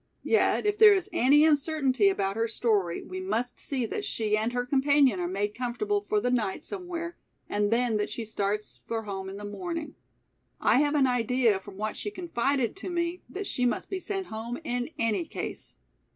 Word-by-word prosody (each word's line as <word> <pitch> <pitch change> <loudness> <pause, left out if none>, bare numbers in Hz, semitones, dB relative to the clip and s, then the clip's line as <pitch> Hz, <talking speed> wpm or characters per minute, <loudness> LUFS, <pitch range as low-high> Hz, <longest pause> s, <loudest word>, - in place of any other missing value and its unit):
Yet 445 - +2
if 415 0 +1
there 425 -2 +9
is 375 -2 -2
any 295 0 +5
uncertainty 280 -7 +3
about 195 0 -1
her 225 +1 +1
story, 210 -7 +1
we 185 0 -6
must 225 +6 -2
see 260 -4 -2
that 410 - -4
she 215 - 0
and 220 +2 0
her 245 0 -1
companion 270 -4 +3
are 175 - -1
made 200 +3 -2
comfortable 255 - -1
for 420 +1 0
the 250 - 0
night 235 - -1
somewhere 350 -3 -5 0.3
and 205 0 0
then 230 -1 +2
that 210 - -1
she 230 - -5
starts 210 0 -2
for 225 -1 -2
home 195 -2 -5
in 195 - -7
the 205 - -7
morning. 330 - -5 0.7
I - - +4
have 295 +1 +2
an 280 -2 +4
idea 245 -3 +2
from 195 0 -12
what 215 +1 -3
she - - -4
confided 280 - -1
to 390 - -6
me 340 0 -2
that 400 +2 -5
she 250 - -2
must 240 - -2
be 380 - -1
sent 390 0 -3
home 225 0 -5
in 245 -2 -2
any 230 +6 +1
case." - - -6
245 Hz, 195 wpm, -28 LUFS, 210-330 Hz, 0.7 s, there